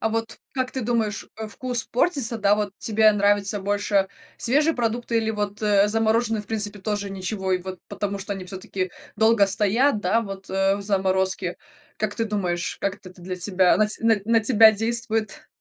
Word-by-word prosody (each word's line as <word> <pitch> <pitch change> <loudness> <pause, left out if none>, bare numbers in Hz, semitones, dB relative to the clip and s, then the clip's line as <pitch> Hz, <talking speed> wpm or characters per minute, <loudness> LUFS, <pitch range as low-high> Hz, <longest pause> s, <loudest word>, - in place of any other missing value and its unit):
А 220 - +1
вот 225 0 -3
как 255 -1 -2
ты 260 - -4
думаешь, 225 -2 -1
э, 220 -1 -5
вкус 245 +2 -1
портится, 250 -4 0
да? 205 -1 +4
Вот 210 -2 -2
тебе 220 0 +4
нравится 205 0 +1
больше 200 -1 +1 0.3
свежие 295 +6 +2
продукты 235 0 -1
или 220 0 0
вот, 210 0 -4
э, 205 -1 +4
замороженные, 225 0 +1
в - - -20
принципе, 210 -2 -3
тоже 205 -1 -2
ничего? 190 0 -3
И 180 - +2
вот 185 -1 -7
потому 200 -1 -3
что 200 +1 -4
они 190 - -7
всё-таки 185 -1 -4 0.3
долго 220 -2 +4
стоят, 210 +5 +2
да, 205 +5 +2
вот, 195 -2 -8
э, 195 +1 +2
в 200 - -6
заморозке. 190 -2 0 0.4
Как 210 -1 -2
ты 225 - -1
думаешь, 185 -5 -2
как 195 0 -1
это 185 -2 -13
то 180 - -16
для 185 0 -5
тебя 185 0 +3
на 215 - +3
ть 215 - -3
на 225 -1 +4
на 230 0 +4
тебя 220 -1 +6
действует? 225 0 -2
210 Hz, 190 wpm, -24 LUFS, 195-225 Hz, 0.4 s, тебя